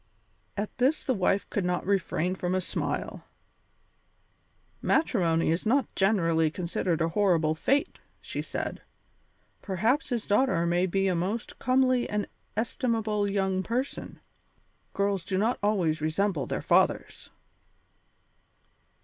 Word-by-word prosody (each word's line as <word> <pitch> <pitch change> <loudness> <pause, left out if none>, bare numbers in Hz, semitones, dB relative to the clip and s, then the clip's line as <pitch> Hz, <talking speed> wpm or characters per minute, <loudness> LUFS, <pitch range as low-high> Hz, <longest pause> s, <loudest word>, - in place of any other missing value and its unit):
At 205 +1 -3
this 270 +5 +2
the 260 - +1
wife 195 -1 +1
could 200 - 0
not 180 0 -1
refrain 185 -2 0
from 185 0 -2
a - - +2
smile. - - -3 1.6
"Matrimony 170 - +2
is 165 - 0
not 250 +2 +1
generally 165 -5 +2
considered 170 0 -2
a 165 - +2
horrible 165 -4 +2
fate," 275 - 0 0.2
said - - -4
she; - - -29 0.8
"perhaps 220 - 0
his 240 -4 -1
daughter 205 -6 +2
may 175 +2 +2
be 195 +2 +1
a 185 - +2
most 190 +7 -3
comely 255 -1 +2
and 210 -1 -1 0.3
estimable 220 -3 0
young 190 -1 0
person. 245 +7 -3 0.7
Girls 200 -2 0
do 190 +1 -2
not 225 +5 +1
always 180 -7 +1
resemble 160 0 0
their - - -3
fathers." - - +1
195 Hz, 125 wpm, -28 LUFS, 175-225 Hz, 1.6 s, this